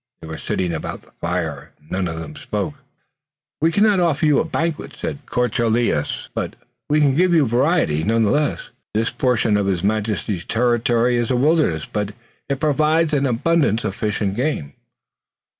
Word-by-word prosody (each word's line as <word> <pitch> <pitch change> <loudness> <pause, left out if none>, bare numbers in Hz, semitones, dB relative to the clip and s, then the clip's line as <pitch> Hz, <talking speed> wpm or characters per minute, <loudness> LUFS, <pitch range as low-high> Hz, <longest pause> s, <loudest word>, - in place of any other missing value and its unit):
They - - -7
were 80 -1 -6
sitting 90 -2 -2
about 80 - -5
the - - -23
fire 85 -5 -3
and 75 - -24
none 95 -1 0
of 80 0 -4
them 75 -2 -8
spoke. 105 +9 -3 0.9
"We 165 +1 +3
cannot 205 +1 +4
offer 165 -3 +2
you 150 -2 +4
a - - +2
banquet," 165 0 -3
said 145 - -5
de - - -21
Courcelles, 120 - 0
"but - - -3 0.3
we 150 +1 +3
can 145 -3 +4
give 175 +4 +3
you 155 -4 +5
variety, 120 - +2
none 115 +3 +2
the 105 - +2
less. 150 0 -1 0.2
This 110 +1 +1
portion 120 -5 +2
of 100 -1 0
His 90 -3 0
Majesty's 105 -3 -1
territory 120 0 +2
is 120 -1 0
a 130 - +2
wilderness, 135 - +2
but 105 -1 -3 0.3
it 140 -1 -1
provides 155 +2 +2
an 140 -1 +2
abundance 125 -1 +1
of - - -2
fish 105 +1 -2
and 100 -2 0
game." 125 - -2
120 Hz, 180 wpm, -21 LUFS, 100-150 Hz, 0.9 s, you